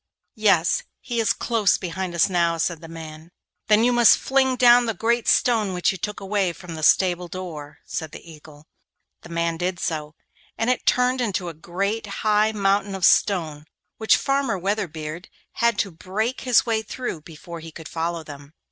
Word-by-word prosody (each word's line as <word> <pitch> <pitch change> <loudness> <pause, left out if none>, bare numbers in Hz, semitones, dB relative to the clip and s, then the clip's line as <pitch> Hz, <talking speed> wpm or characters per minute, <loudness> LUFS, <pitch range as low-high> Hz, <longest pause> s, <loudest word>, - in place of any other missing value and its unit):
'Yes; 195 -6 +2 0.2
he 240 -2 -4
is 220 -3 +2
close 225 -4 +1
behind 180 0 -5
us 170 - +4
now,' 170 -3 +1
said 165 0 -2
the 165 - -10
man. 160 0 -10 0.4
'Then 215 +1 +4
you 245 +1 +3
must 240 -1 +6
fling 265 -1 +1
down 245 -1 +6
the 225 - -1
great 235 0 0
stone 215 -6 +2
which 180 - +2
you 190 - -6
took 210 +4 -4
away 195 -2 -1
from 175 0 -10
the 160 - -7
stable 180 +2 +3
door,' 165 -5 -8
said 160 -3 -5
the - - -12
Eagle. 150 -1 -15 0.6
The - - -13
man 170 0 -1
did 180 +1 -2
so, 155 -1 -3 0.4
and 225 +3 +1
it 255 - -3
turned 250 +1 +2
into 195 -6 -2
a - - -8
great 195 +7 -3 0.2
high 215 0 +3
mountain 200 -1 0
of 190 -3 +1
stone, 160 -7 +2 0.3
which 220 - +4
Farmer 275 -6 0
Weatherbeard 175 -4 -4 0.3
had 235 -2 +3
to 195 - -1
break 210 +9 -3
his 250 -3 +3
way 225 -2 0
through 220 -6 -5
before 165 +2 -10
he 165 0 -10
could 160 0 -10
follow 165 0 -3
them. 145 -1 -12
185 Hz, 185 wpm, -23 LUFS, 165-220 Hz, 0.6 s, must